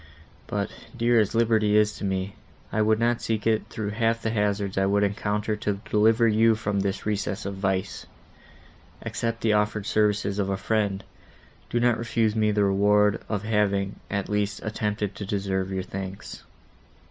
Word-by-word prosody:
But, -, -, -2 dB, 0.3 s
dear 120 Hz, 0 st, +3 dB
as 105 Hz, 0 st, +1 dB
liberty 110 Hz, -2 st, +3 dB
is 105 Hz, 0 st, +3 dB
to -, -, -8 dB
me, 95 Hz, 0 st, -2 dB, 0.4 s
I 110 Hz, -, +1 dB
would 110 Hz, 0 st, +3 dB
not 120 Hz, +1 st, +1 dB
seek 110 Hz, -3 st, -2 dB
it 110 Hz, -1 st, +1 dB
through 110 Hz, -3 st, -4 dB
half 115 Hz, +1 st, 0 dB
the 110 Hz, -, 0 dB
hazards 105 Hz, -2 st, 0 dB
I 95 Hz, 0 st, +2 dB
would 100 Hz, +1 st, +2 dB
encounter 105 Hz, +1 st, -1 dB
to 105 Hz, -1 st, -2 dB
deliver 110 Hz, +2 st, +4 dB
you 110 Hz, +1 st, +4 dB
from 105 Hz, -2 st, -2 dB
this 100 Hz, 0 st, -2 dB
recess 105 Hz, -1 st, -2 dB
of 100 Hz, -, -3 dB
vice. 95 Hz, -1 st, -2 dB, 1.0 s
Accept 115 Hz, 0 st, -3 dB
the 110 Hz, -2 st, +2 dB
offered 105 Hz, 0 st, 0 dB
services 105 Hz, -2 st, +1 dB
of 100 Hz, -1 st, 0 dB
a 95 Hz, -, -1 dB
friend; 100 Hz, -2 st, -1 dB, 0.7 s
do 120 Hz, -, 0 dB
not 120 Hz, -1 st, +2 dB
refuse 115 Hz, -2 st, 0 dB
me 110 Hz, -1 st, +2 dB
the 105 Hz, -1 st, +2 dB
reward 105 Hz, +1 st, +3 dB
of 105 Hz, -2 st, -2 dB
having, 100 Hz, -2 st, 0 dB
at 100 Hz, -1 st, -2 dB
least, 105 Hz, 0 st, -1 dB
attempted 105 Hz, -1 st, -2 dB
to -, -, -5 dB
deserve 95 Hz, -1 st, -1 dB
your 95 Hz, -1 st, -2 dB
thanks." 95 Hz, 0 st, -7 dB
105 Hz, 170 wpm, -25 LUFS, 100-110 Hz, 1.0 s, deliver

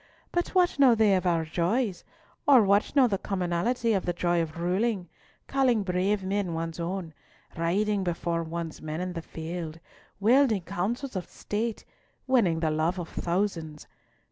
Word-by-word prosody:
But 350 Hz, +2 st, -1 dB
what 355 Hz, -5 st, +3 dB
know 260 Hz, -4 st, +7 dB
they 215 Hz, -2 st, +4 dB
of 185 Hz, -1 st, 0 dB
our 165 Hz, -2 st, +1 dB
joys, 180 Hz, +5 st, -1 dB, 0.4 s
or 265 Hz, -5 st, +7 dB
what 200 Hz, +6 st, +2 dB
know 275 Hz, -3 st, +6 dB
the 195 Hz, -4 st, -1 dB
commonalty 195 Hz, +5 st, 0 dB
of 195 Hz, -3 st, -1 dB
the 175 Hz, -, +1 dB
joy 175 Hz, 0 st, +1 dB
of 160 Hz, 0 st, -5 dB
ruling, 185 Hz, +1 st, 0 dB, 0.4 s
calling 255 Hz, -6 st, +2 dB
brave 190 Hz, +2 st, 0 dB
men 190 Hz, -3 st, -1 dB
one's 165 Hz, +1 st, -4 dB
own, 170 Hz, -1 st, -4 dB, 0.4 s
riding 195 Hz, +4 st, +1 dB
before 170 Hz, -1 st, -1 dB
one's 165 Hz, 0 st, -5 dB
men 155 Hz, +1 st, -4 dB
in 180 Hz, 0 st, -3 dB
the 165 Hz, -, -4 dB
field, 165 Hz, 0 st, -6 dB, 0.4 s
wielding 225 Hz, -2 st, +4 dB
counsels 210 Hz, +9 st, -3 dB
of 185 Hz, -, -4 dB
State, 220 Hz, +2 st, -3 dB, 0.4 s
winning 200 Hz, -11 st, +2 dB
the 160 Hz, -2 st, +1 dB
love 160 Hz, +4 st, 0 dB
of 175 Hz, -2 st, -5 dB
thousands? 170 Hz, -4 st, -2 dB
185 Hz, 160 wpm, -27 LUFS, 170-215 Hz, 0.4 s, know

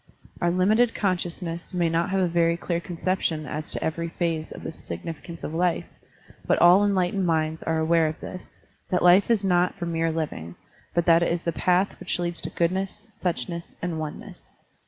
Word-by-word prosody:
Our 175 Hz, -, +3 dB
limited 215 Hz, +7 st, +3 dB
consciousness 175 Hz, -2 st, -2 dB
may 175 Hz, -1 st, +2 dB
not 165 Hz, +2 st, +1 dB
have 190 Hz, 0 st, +1 dB
a 180 Hz, -, +3 dB
very 170 Hz, 0 st, +2 dB
clear 170 Hz, 0 st, -2 dB
conception 175 Hz, -3 st, -2 dB
as 150 Hz, +1 st, -5 dB
to -, -, -3 dB
every 170 Hz, +1 st, -2 dB
phase 165 Hz, -2 st, -2 dB
of -, -, -9 dB
the -, -, -4 dB
significance 160 Hz, -, -8 dB
of 155 Hz, -, -4 dB
life, 175 Hz, +1 st, +1 dB, 0.6 s
but -, -, +3 dB
all 175 Hz, +2 st, +7 dB
enlight 190 Hz, -3 st, +2 dB
ened 195 Hz, -2 st, 0 dB
minds 160 Hz, -1 st, 0 dB
are 165 Hz, 0 st, 0 dB
aware 160 Hz, 0 st, +3 dB
of 155 Hz, -, -4 dB
this, 185 Hz, -, -9 dB, 0.3 s
that 180 Hz, -, +1 dB
life 180 Hz, +4 st, +6 dB
is 225 Hz, -4 st, +3 dB
not 180 Hz, -1 st, +2 dB
for 175 Hz, -, -3 dB
mere 165 Hz, -1 st, 0 dB
living, 145 Hz, -, -4 dB, 0.4 s
but 170 Hz, -1 st, +2 dB
that 170 Hz, -1 st, +6 dB
it 170 Hz, -, +2 dB
is 170 Hz, 0 st, -1 dB
the 170 Hz, -, 0 dB
path 180 Hz, +4 st, +1 dB
which -, -, -2 dB
leads 175 Hz, -1 st, -1 dB
to -, -, -3 dB
goodness, 190 Hz, +5 st, -2 dB
suchness, 170 Hz, 0 st, -4 dB
and 170 Hz, -2 st, -3 dB
oneness. 155 Hz, -1 st, -7 dB
170 Hz, 195 wpm, -25 LUFS, 165-180 Hz, 0.6 s, all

